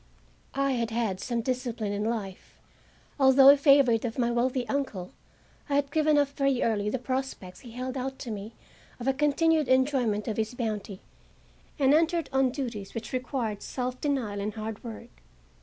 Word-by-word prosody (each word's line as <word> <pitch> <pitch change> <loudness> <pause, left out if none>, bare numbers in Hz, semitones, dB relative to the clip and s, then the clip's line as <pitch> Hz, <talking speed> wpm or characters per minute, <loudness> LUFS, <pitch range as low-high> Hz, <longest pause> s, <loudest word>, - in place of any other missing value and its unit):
I 275 0 +1
had 235 -3 -1
had 220 -5 -1
some 235 +2 -2
discipline 240 -4 -2
in 205 +1 -2
life. 215 -4 -4 0.6
Although 270 0 +7
a 280 - +9
favorite 275 -5 +4
of 230 -2 -3
my 240 -1 +1
wealthy 245 +1 0
uncle, 225 -10 -3 0.6
I 280 - +1
had 285 0 +1
given 310 -1 +3
up 285 -1 +3
very 275 -2 0
early 210 -2 0
the 260 - -1
prospects 255 -7 -4
he 235 -3 -12
held 255 +1 -4
out 265 0 -4
to 240 - -6
me 210 +1 -6 0.5
of 245 - -5
a 270 - +3
continued 300 +2 +2
enjoyment 260 -5 +2
of 220 - -2
his 220 +2 -2
bounty, 210 -5 -4 0.8
and 275 -1 +4
entered 330 -1 +2
on 265 -1 +3
duties 240 -7 -5
which 230 +1 -6
required 245 -5 -2
self 255 0 -4
denial 245 -9 -1
and 210 +2 -3
hard 215 -1 -6
work. 215 - -10
250 Hz, 175 wpm, -28 LUFS, 220-275 Hz, 0.8 s, a